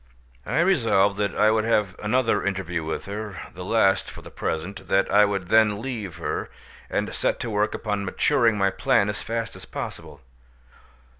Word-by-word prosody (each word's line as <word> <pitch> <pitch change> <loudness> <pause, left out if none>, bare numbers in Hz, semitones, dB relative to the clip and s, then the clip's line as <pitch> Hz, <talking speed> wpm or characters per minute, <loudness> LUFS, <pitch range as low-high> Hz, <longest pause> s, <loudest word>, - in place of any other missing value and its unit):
I - - +2
resolved 115 - +3
that 100 -3 0
I 110 +1 +4
would 110 0 +2
have 105 -4 +1
another 110 -1 +1
interview 95 -4 -2
with 80 - -4
her—the 100 -3 -7
last 95 -1 +2
for - - -11
the - - -11
present—that 95 +3 -1
I 105 +1 +6
would 100 -3 -3
then 110 -2 +4
leave 110 -7 -5
her, - - -3 0.4
and - - -2
set - - 0
to 120 - -3
work 105 +1 0
upon 105 -2 -2
maturing 115 +3 +2
my 100 -1 +2
plan 130 -6 +2
as 105 - -4
fast 115 0 -3
as - - -11
possible. 75 -3 -7
105 Hz, 165 wpm, -24 LUFS, 95-110 Hz, 0.4 s, I